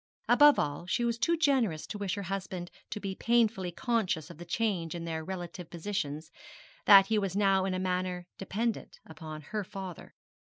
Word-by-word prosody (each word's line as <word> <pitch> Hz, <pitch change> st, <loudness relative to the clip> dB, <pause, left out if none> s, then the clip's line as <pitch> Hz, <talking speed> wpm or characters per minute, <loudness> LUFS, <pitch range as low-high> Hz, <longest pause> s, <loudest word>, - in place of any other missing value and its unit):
Above 295 Hz, 0 st, +7 dB
all, 145 Hz, +4 st, -2 dB
she 240 Hz, +5 st, +1 dB
was 235 Hz, 0 st, -1 dB
too 335 Hz, +9 st, +2 dB
generous 260 Hz, -, +2 dB
to 210 Hz, -, -6 dB
wish 195 Hz, -3 st, -1 dB
her 200 Hz, -, -4 dB
husband 185 Hz, -2 st, -4 dB, 0.2 s
to -, -, -4 dB
be 195 Hz, -2 st, -4 dB
painfully 225 Hz, -4 st, +2 dB
conscious 185 Hz, -7 st, -1 dB
of -, -, -13 dB
the 175 Hz, -, -8 dB
change 175 Hz, -3 st, -1 dB
in 170 Hz, -1 st, -5 dB
their 160 Hz, -1 st, -3 dB
relative 175 Hz, -1 st, -6 dB
positions, 160 Hz, -3 st, -4 dB, 0.6 s
that 195 Hz, -1 st, +10 dB
he 220 Hz, +1 st, +1 dB
was 195 Hz, -2 st, -2 dB
now 195 Hz, -2 st, +3 dB
in 190 Hz, -1 st, -1 dB
a -, -, -1 dB
manner 180 Hz, -1 st, -2 dB
dependent 220 Hz, +4 st, -3 dB
upon 155 Hz, -1 st, -8 dB
her 210 Hz, +8 st, -4 dB
father. 190 Hz, -3 st, -8 dB
190 Hz, 180 wpm, -30 LUFS, 175-210 Hz, 0.6 s, that